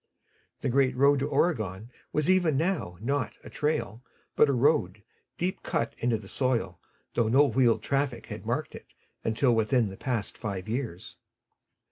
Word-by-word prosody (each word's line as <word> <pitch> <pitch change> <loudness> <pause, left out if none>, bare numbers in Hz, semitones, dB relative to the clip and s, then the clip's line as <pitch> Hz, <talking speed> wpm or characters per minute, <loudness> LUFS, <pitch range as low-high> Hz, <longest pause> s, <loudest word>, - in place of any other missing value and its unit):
The - - 0
great 130 0 +2
road 140 +2 +4
to 140 - -1
Oregon 110 - 0 0.2
was 150 +1 0
even 175 -6 +3
now 160 - -1
not 140 +4 -1
a - - -11
trail 135 -7 -1 0.3
but 150 - +5
a - - +4
road, 120 - +2 0.3
deep 185 +3 -2
cut 115 - -1
into 120 -1 +1
the 105 -2 -11
soil, 115 -8 -1 0.3
though 115 -2 +2
no 135 +6 +5
wheeled 130 -5 +2
traffic 135 -4 -1
had - - -8
marked - - -2
it - - -13 0.3
until 120 +3 +2
within 115 0 +2
the 95 - -9
past 120 -6 -3
five 100 -4 -4
years. 110 -6 -4
125 Hz, 160 wpm, -28 LUFS, 110-140 Hz, 0.3 s, but